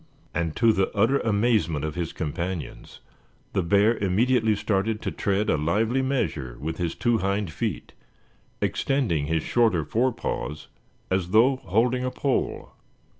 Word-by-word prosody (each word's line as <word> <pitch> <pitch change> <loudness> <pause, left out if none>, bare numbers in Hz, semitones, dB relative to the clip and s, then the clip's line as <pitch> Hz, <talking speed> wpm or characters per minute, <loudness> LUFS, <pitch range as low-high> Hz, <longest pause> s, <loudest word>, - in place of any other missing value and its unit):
And 85 -1 -2
to 115 -1 +4
the 95 -1 +1
utter 120 +7 +3
amazement 105 - +1
of 75 - -3
his 85 -1 -3
companions 85 +2 -5 0.5
the 95 - +1
bear 100 +6 +3
immediately 110 +3 +2
started 105 +2 0
to - - -2
tread 100 +1 0
a - - +2
lively 110 - +1
measure 80 - -2
with 80 +2 -4
his 85 -2 -2
two 120 -2 +1
hind 100 -2 -1
feet, - - -4 0.7
extending 95 - 0
his 80 0 0
shorter 110 -10 +2
forepaws 115 - -2 0.4
as 95 -2 0
though 120 +7 +4
holding 120 +5 +1
a 130 - 0
pole. 135 +1 -2
100 Hz, 140 wpm, -25 LUFS, 85-115 Hz, 0.7 s, to